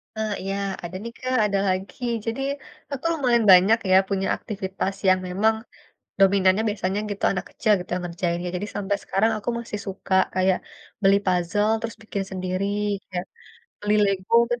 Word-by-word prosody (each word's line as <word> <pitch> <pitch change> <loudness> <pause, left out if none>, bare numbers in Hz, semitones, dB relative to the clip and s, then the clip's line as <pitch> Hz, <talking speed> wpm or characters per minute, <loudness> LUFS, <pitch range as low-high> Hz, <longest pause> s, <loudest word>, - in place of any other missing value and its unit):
Ah, 220 -1 -2
iya. 195 +1 -3 0.3
Ada 175 +1 -6
nih, 235 - -5
Kak, 255 0 -1
ada 200 -1 +1
lagi. 190 +7 -2 0.2
Jadi, 230 +3 -2 0.5
aku - - -5
tuh 330 - +1
lumayan 245 -5 +3
banyak 190 +5 +7
ya, - - +7
punya 195 -1 0
aktivitas 195 -1 -4
yang 185 0 +5
memang, 210 +5 +2 0.6
dominannya 195 +1 +4
biasanya 200 -1 -1
gitu, 205 -1 -6
anak 190 - -3
kecil 215 - 0
gitu, 180 - -11
yang 180 - -3
ngerjainnya. 175 0 -2
Jadi 200 +3 -3
sampai 200 0 0
sekarang, 220 +4 +2
aku 215 - -4
masih 225 -3 -5
suka 190 0 -4 0.2
kayak 185 0 +3 0.4
beli 195 0 +5
puzzle, 185 +4 +1
terus 230 0 -4
bikin 205 -2 -3
sendiri, 185 +1 -2 0.4
kayak 180 0 -3 0.6
beli 205 0 +1
Lego 195 +1 -1 0.2
men 240 0 -1
195 Hz, 170 wpm, -24 LUFS, 185-215 Hz, 0.6 s, banyak